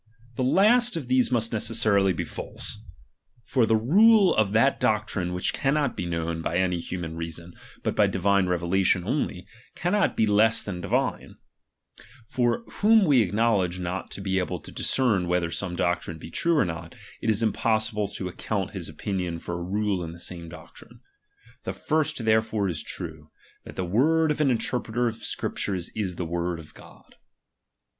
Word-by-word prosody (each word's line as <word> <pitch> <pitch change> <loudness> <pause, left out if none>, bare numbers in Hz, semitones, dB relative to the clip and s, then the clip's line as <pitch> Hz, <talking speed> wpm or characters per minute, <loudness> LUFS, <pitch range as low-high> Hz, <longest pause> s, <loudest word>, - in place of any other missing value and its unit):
The 130 - -1
last 220 - +4
of 135 -6 -6
these 130 0 +3
must 115 -1 0
ne 110 - 0
cessarily 110 -3 +2
be 85 - -2
false; 105 - -7 0.6
for 115 +1 +1
the 110 - +4
rule 200 - +5
of 110 -2 +2
that 125 +6 +3
doctrine 105 -4 0
which 90 0 -1
cannot 140 -1 0
be 90 - -3
known 85 -1 -2
by 85 +1 -1
any 90 -1 +1
human 85 -1 -5
reason, 85 +1 -6 0.3
but - - -1
by - - +4
divine 100 0 +2
revelation 90 +1 +1
only, 95 - -2 0.3
cannot 195 +4 +1
be 110 - +4
less 110 +2 +3
than 90 -4 -5
divine; - - -1 0.9
for 120 - 0 0.2
whom 215 0 +5
we 140 -7 +5
acknowledge 105 -3 +1
not 90 +1 -4
to - - -7
be 95 -1 0
able 90 0 -2
to - - -11
discern 110 -9 +1
whether 90 -1 0
some 90 -1 -3
doctrine 90 -2 -1
be 80 +1 -10
true 170 -1 +1
or 140 - +4
not, 80 -1 -6 0.3
it 110 - -1
is 110 +1 +2
impossible 110 -1 +1
to 95 - -5
account 95 +1 -3
his 95 -5 -6
opinion 90 +1 -3
for 85 - -6
a 85 0 -4
rule 100 0 -1
in 85 0 -6
the 85 - -12
same 85 -1 -5
doctrine. 80 0 -14 0.6
The - - -3
first 155 -6 -1
therefore 110 -2 +2
is 80 -5 -3
true, 80 -2 -7 0.4
that - - -10
the 95 - -2
word 155 - +3
of 150 - -1
an 145 - +3
interpreter 120 -1 -1
of 115 -1 -1
Scriptures 95 -4 -3
i.t 100 -4 -2
the 85 - -3
word 85 +1 -2
of 80 -2 -13
God. - - -17
100 Hz, 175 wpm, -26 LUFS, 90-120 Hz, 0.9 s, rule